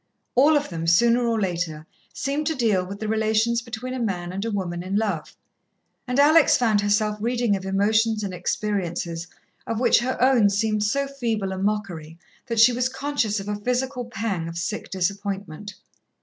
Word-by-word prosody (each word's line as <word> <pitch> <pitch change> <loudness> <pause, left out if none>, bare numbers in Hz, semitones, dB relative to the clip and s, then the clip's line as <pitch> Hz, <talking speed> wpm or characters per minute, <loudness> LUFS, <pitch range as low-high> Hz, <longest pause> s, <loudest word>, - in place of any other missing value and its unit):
All 295 +5 +5
of 290 - -3
them, 165 -2 -4
sooner 235 +7 +4
or 230 -1 +1
later, 170 -5 -2 0.3
seemed 275 - -2
to 320 - 0
deal 220 -8 +2
with 195 +2 -8
the 215 - -4
relations 220 +2 +1
between 235 +2 -6
a 260 - -4
man 180 -5 -2
and 195 +2 -3
a 230 - -2
woman 180 -5 -3
in 185 +2 -4
love, 205 -7 -2 0.7
and 250 +1 -1
Alex 310 +2 +6
found 220 -4 +2
herself 210 +1 +1
reading 235 -2 +1
of 190 -1 -5
emotions 215 +3 +2
and 195 -2 -4
experiences 175 -3 -3 0.4
of 225 -1 -2
which 240 -2 +4
her 255 +2 -2
own 245 -5 +4
seemed 210 +1 0
so 275 +7 +1
feeble 230 -8 -2
a 190 - -4
mockery, 190 -6 -3 0.3
that 230 -2 -1
she 235 +2 +7
was 250 +1 0
conscious 265 -6 -1
of 195 - -7
a 210 - -1
physical 250 +4 -2
pang 200 -7 -3
of 165 0 -6
sick 190 +5 -4
disappointment. 200 0 -3
215 Hz, 180 wpm, -24 LUFS, 190-240 Hz, 0.7 s, she